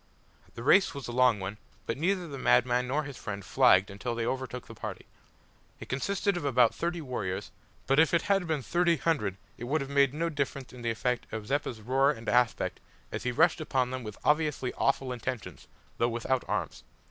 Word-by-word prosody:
The 115 - -7
race 195 +7 +5
was 140 -4 -6
a - - -4
long 125 -3 +4
one, 95 +3 -5 0.3
but 115 - -2
neither 180 +4 0
the 140 -3 -7
madman 125 0 +3
nor 145 +4 0
his 140 -4 -8
friend 100 -2 -6
flagged 100 -7 +4
until 115 +4 -4
they 115 0 -1
overtook 130 0 -3
the 115 - -11
party. 110 - -7 0.7
It - - -10
consisted 200 +8 0
of 175 - -3
about 125 -4 +4
thirty 170 0 -2
warriors, 105 -8 -4 0.3
but 135 +2 +3
if 160 - +5
it 170 0 +2
had 195 -3 +1
been 155 -4 -1
thirty 170 +1 +2
hundred 105 - 0 0.2
it 120 - -5
would 150 +6 +1
have 140 -1 -5
made 140 -2 +4
no 165 +2 0
difference 140 -4 -3
in 125 - -10
the 120 - -1
effect 120 +2 -1
of 110 -1 -5
Zeppa's 130 -3 -2
roar 135 +5 +3
and 115 -6 -3
aspect 125 -1 +1 0.3
as - - -4
he 125 - +1
rushed 160 +5 +3
upon 130 -4 0
them 130 0 -3
with 105 -2 -7
obviously 150 -4 +1
awful 135 -1 0
intentions, 120 -1 -6 0.3
though 120 - +3
without 120 +2 -1
arms. - - -3
130 Hz, 205 wpm, -29 LUFS, 120-150 Hz, 0.7 s, race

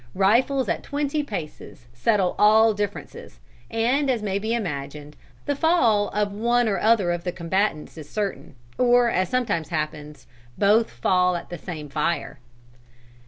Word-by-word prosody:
Rifles 235 +7 +2
at 170 - -1
twenty 290 +1 -2
paces 165 - -8
settle 190 - +1
all 220 +1 +5
differences, 205 0 -6 0.3
and 250 +5 +1
as 240 -4 0
may 200 -1 -1
be 220 +2 -3
imagined, 150 -8 -4 0.3
the 285 - -1
fall 250 -10 +2
of 210 -1 -1
one 235 +3 +1
or 200 - 0
other 215 -5 +3
of 175 0 -3
the 180 - -2
combatants 170 -2 -2
is 150 -1 -11
certain, 200 -8 -4 0.2
or, 245 -1 +4
as 185 0 0
sometimes 220 -11 -1
happens, 150 -1 -5 0.3
both 215 +3 +3
fall 180 +9 +1
at 175 - -7
the 175 - -5
same 155 -4 -7
fire." 150 +4 -2
205 Hz, 150 wpm, -23 LUFS, 170-235 Hz, 0.3 s, all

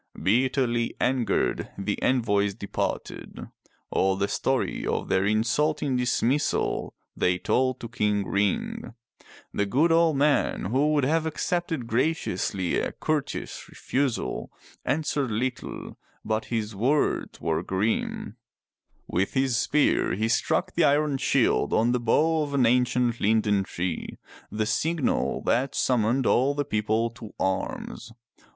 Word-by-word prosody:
Bitterly 120 - +1
angered, 125 -2 0
the 100 +1 -3
envoys 105 -6 +1
departed. 100 -2 -4 0.4
All 95 0 +2
the 100 +1 0
story - - -1
of - - -2
their 95 +1 +2
insulting 130 +6 +1
dismissal 125 +3 0 0.2
they 90 0 +1
told 130 +6 0
to 115 - -5
King 105 -4 0
Ring. 100 +3 -1 0.6
The 100 - 0
good 150 +11 +3
old 165 -3 +4
man, 145 -7 +2
who 145 +4 +2
would 145 -2 +2
have 160 +4 +1
accepted 165 -4 -2
graciously 110 - 0
a - - -3
courteous 155 -2 -3
refusal, 135 -2 -2 0.3
answered 150 -3 0
little, 125 +4 -4 0.3
but 110 0 -1
his 110 -2 -3
words 135 +9 0
were 80 -1 -1
grim. 100 +4 -2 0.7
With 95 +3 -1
his 130 -2 +2
spear 140 +5 +2
he 110 +3 0
struck 115 - +1
the - - +2
iron 145 0 +3
shield - - +2
on 115 +2 +3
the 125 - +1
bough 155 +7 +2
of 145 -1 -2
an 130 -3 +4
ancient 125 0 +2
linden 105 -2 +2
tree, 90 -2 -4 0.3
the 110 +1 -1
signal 155 +7 0
that 130 +3 +1
summoned 125 +1 +1
all 135 +3 +3
the 145 0 -1
people 110 -1 0
to 115 -2 -11
arms. 95 +4 -3
120 Hz, 130 wpm, -26 LUFS, 105-140 Hz, 0.7 s, old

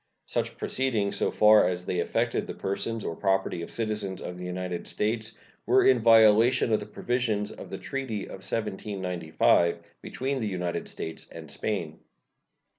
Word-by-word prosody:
Such - - -2
proceedings, 110 -7 -1
so - - +1
far 105 -2 +6
as 90 0 -4
they 90 - -1
affected 85 - 0
the - - -6
persons 105 +3 -3
or 85 - -3
property 95 -2 0
of 85 - -6
citizens 105 -4 -3
of 90 - -6
the 90 0 -7
United 90 -1 -4
States, 110 +1 -2 0.3
were - - +5
in 130 -2 +6
violation 115 +1 +5
of 110 - +3
the - - -8
provisions 115 -4 -1
of - - -10
the - - -5
treaty 130 -7 -4
of 95 - -9
1795 90 -6 0 0.2
between 135 +1 -3
the 110 - -1
United 90 -3 -3
States 80 - -5
and - - -10
Spain. 85 -7 -3
105 Hz, 160 wpm, -27 LUFS, 90-115 Hz, 0.3 s, far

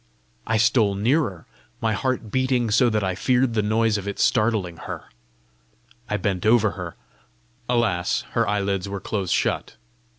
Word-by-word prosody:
I 110 - +2
stole 110 -2 +3
nearer, 105 - 0 0.3
my 110 -1 0
heart 125 -2 -2
beating 130 -2 +1
so 120 +3 +4
that 110 -2 0
I 95 -1 0
feared 125 +5 +1
the 110 - +2
noise 110 0 +1
of 100 - -8
it 100 - -4
startling 105 -7 +1
her. - - -7 1.1
I 105 - 0
bent 95 -2 -2
over 110 -1 +4
her. 90 -3 -7 0.7
Alas, 110 -8 +1
her - - +1
eyelids 100 -1 -1
were 100 0 -4
close 95 -2 -3
shut! - - 0
105 Hz, 155 wpm, -23 LUFS, 100-120 Hz, 1.1 s, so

